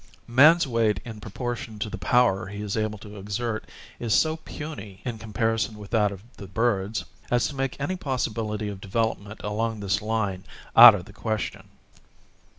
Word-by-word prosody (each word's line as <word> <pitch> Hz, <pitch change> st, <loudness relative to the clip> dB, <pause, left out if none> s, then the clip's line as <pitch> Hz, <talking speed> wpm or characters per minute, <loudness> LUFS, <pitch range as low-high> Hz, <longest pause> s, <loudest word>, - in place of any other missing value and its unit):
Man's 155 Hz, +8 st, +6 dB
weight 115 Hz, -4 st, +1 dB
in 110 Hz, -3 st, -8 dB
proportion 115 Hz, 0 st, -5 dB
to 105 Hz, +2 st, -3 dB
the 105 Hz, -2 st, -6 dB
power 100 Hz, -1 st, +3 dB
he 105 Hz, +1 st, -6 dB
is 100 Hz, -1 st, -3 dB
able 110 Hz, -1 st, -1 dB
to 105 Hz, 0 st, -11 dB
exert 110 Hz, +3 st, -3 dB, 0.3 s
is 115 Hz, -3 st, +1 dB
so 160 Hz, 0 st, +3 dB
puny 115 Hz, -12 st, -8 dB
in 120 Hz, -3 st, -4 dB
comparison 110 Hz, 0 st, -1 dB
with 105 Hz, -1 st, -11 dB
that 105 Hz, -3 st, +3 dB
of 100 Hz, -1 st, -9 dB
the 100 Hz, -, -9 dB
birds, 110 Hz, 0 st, 0 dB, 0.2 s
as 120 Hz, -1 st, +2 dB
to 145 Hz, -, -8 dB
make 135 Hz, 0 st, -2 dB
any 165 Hz, +7 st, -1 dB
possibility 115 Hz, -, -2 dB
of 100 Hz, -2 st, -6 dB
development 110 Hz, 0 st, -2 dB
along 110 Hz, +1 st, -2 dB
this 95 Hz, -4 st, 0 dB
line 105 Hz, -4 st, -1 dB, 0.3 s
out 115 Hz, -2 st, +12 dB
of 90 Hz, -3 st, -6 dB
the -, -, -14 dB
question. 110 Hz, -3 st, -4 dB
110 Hz, 170 wpm, -26 LUFS, 105-120 Hz, 0.3 s, out